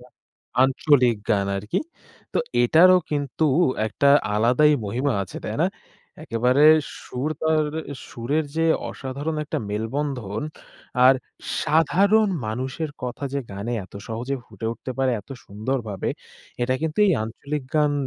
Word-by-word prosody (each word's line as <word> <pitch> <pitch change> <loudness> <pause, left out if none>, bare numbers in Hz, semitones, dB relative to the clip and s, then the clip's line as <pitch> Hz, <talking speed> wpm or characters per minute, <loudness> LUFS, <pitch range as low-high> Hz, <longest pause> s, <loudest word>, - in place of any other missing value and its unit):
লা - - -15 0.6
আঞ্চলিক 130 -3 +3
গান 100 -3 +2
আর 95 - -4
কি - - +3 0.5
তো - - +1 0.2
এটারও 180 +8 +6
কিন্তু 145 +1 -1 0.4
একটা 140 - 0 0.3
আলাদাই 125 +8 +4
মহিমা 125 +7 0
আছে 95 - -9
তাই - - -3
না? - - +4 0.6
একেবারে 125 +5 +2 0.4
সুর 130 +5 -3
তারের 155 0 0 0.3
সুরের 140 +7 -1
যে 165 - +2 0.3
অসাধারণ 140 +4 -4
একটা 155 +1 -3
মেলবন্ধন 110 -1 -3 0.6
আর 130 - +8 0.5
সাধারণ 195 +8 +3 0.2
মানুষের 130 +8 -3
কথা 125 +3 -4
যে 140 - 0
গানে 100 +4 -4
এত 95 - -19
সহজে 120 +5 -3
ফুটে 110 +1 -7
উঠতে 125 - -8
পারে 130 -2 +2
এত 105 - -27
সুন্দরভাবে 110 -1 -3 0.5
এটা 130 +1 +1
কিন্তু 160 +2 -2
এই 190 - +4
আঞ্চলিক 140 +6 -4
গান 150 -1 +3
135 Hz, 135 wpm, -23 LUFS, 115-150 Hz, 0.6 s, আর